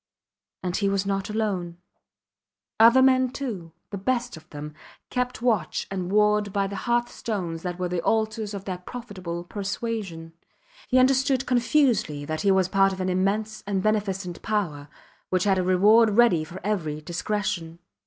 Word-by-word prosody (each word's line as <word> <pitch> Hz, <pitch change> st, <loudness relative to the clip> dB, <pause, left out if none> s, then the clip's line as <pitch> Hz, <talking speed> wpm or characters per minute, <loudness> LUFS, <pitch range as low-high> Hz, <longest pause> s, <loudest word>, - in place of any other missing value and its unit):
And 180 Hz, -1 st, -2 dB
he 200 Hz, -2 st, +1 dB
was 195 Hz, 0 st, 0 dB
not 195 Hz, 0 st, -2 dB
alone. 195 Hz, -6 st, -2 dB, 1.0 s
Other 235 Hz, +4 st, +7 dB
men, 260 Hz, -1 st, +4 dB
too 225 Hz, -11 st, -5 dB, 0.2 s
the 200 Hz, -, -4 dB
best 245 Hz, +4 st, -1 dB
of 160 Hz, +1 st, -15 dB
them 150 Hz, 0 st, -7 dB, 0.4 s
kept 250 Hz, -1 st, -2 dB
watch 215 Hz, -10 st, 0 dB
and 185 Hz, -2 st, -3 dB
ward 210 Hz, 0 st, +3 dB
by 200 Hz, 0 st, 0 dB
the 200 Hz, +1 st, -5 dB
hearthstones 210 Hz, -8 st, -1 dB
that 175 Hz, -1 st, -4 dB
were 180 Hz, 0 st, -1 dB
the 175 Hz, -1 st, -2 dB
altars 220 Hz, 0 st, 0 dB
of 195 Hz, -, -7 dB
that 180 Hz, -2 st, -6 dB
profitable 185 Hz, -8 st, -6 dB
persuasion. 200 Hz, -4 st, -4 dB, 0.5 s
He 255 Hz, -, +2 dB
understood 265 Hz, 0 st, +3 dB
confusedly 235 Hz, -, +2 dB
that 155 Hz, +1 st, -3 dB
he 200 Hz, -, +2 dB
was 190 Hz, -2 st, +3 dB
part 195 Hz, +1 st, +3 dB
of 190 Hz, -, -7 dB
an 185 Hz, 0 st, -1 dB
immense 205 Hz, +4 st, -1 dB
and 195 Hz, -2 st, -1 dB
beneficent 195 Hz, -4 st, -1 dB
power, 160 Hz, -10 st, -2 dB, 0.4 s
which 185 Hz, -1 st, +1 dB
had 195 Hz, -2 st, +2 dB
a -, -, +1 dB
reward 210 Hz, +4 st, +5 dB
ready 230 Hz, -10 st, +5 dB
for 170 Hz, +4 st, -9 dB
every 170 Hz, -8 st, -2 dB
discretion. 175 Hz, 0 st, -3 dB
195 Hz, 160 wpm, -25 LUFS, 180-220 Hz, 1.0 s, Other